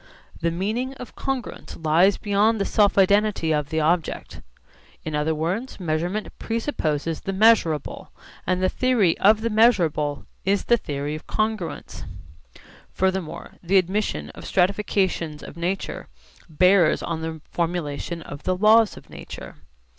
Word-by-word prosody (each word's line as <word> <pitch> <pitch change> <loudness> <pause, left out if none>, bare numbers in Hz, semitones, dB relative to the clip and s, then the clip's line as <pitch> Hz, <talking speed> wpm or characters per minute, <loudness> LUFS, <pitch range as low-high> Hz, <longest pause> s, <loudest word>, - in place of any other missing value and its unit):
The 170 - +1
meaning 220 +10 -2
of 250 - -10
congruence 270 -2 -5
lies 165 +5 +3
beyond 210 +2 +2
the 200 - 0
self 205 -2 +2
identity 200 -3 +3
of 150 -1 -1
the 160 0 0
object. 165 +2 -1 0.6
In 155 - -4
other 150 +1 0
words 185 +13 -3
measurement 175 +4 -2
presupposes 165 - -2
the 195 - -3
measurable, 190 -8 +2 0.4
and 185 0 +1
the - - +4
theory 230 -7 +2
of 215 +2 +5
the 230 0 -1
measurable 175 -10 +2 0.2
is 195 +1 +1
the 240 - +4
theory 145 -6 -4
of 155 - -8
congruence. 215 -5 -3 0.9
Furthermore 190 -3 -2
the 185 +3 +2
admission 185 - -1
of - - -11
stratifications 185 -4 0
of - - -10
nature 175 +3 -3 0.4
bears 180 +1 +4
on 165 -1 -3
the 160 0 -5
formulation 170 -1 -3
of 145 -1 -9
the 185 0 -1
laws 220 +2 +5
of - - -13
nature. - - -9
185 Hz, 140 wpm, -23 LUFS, 160-210 Hz, 0.9 s, of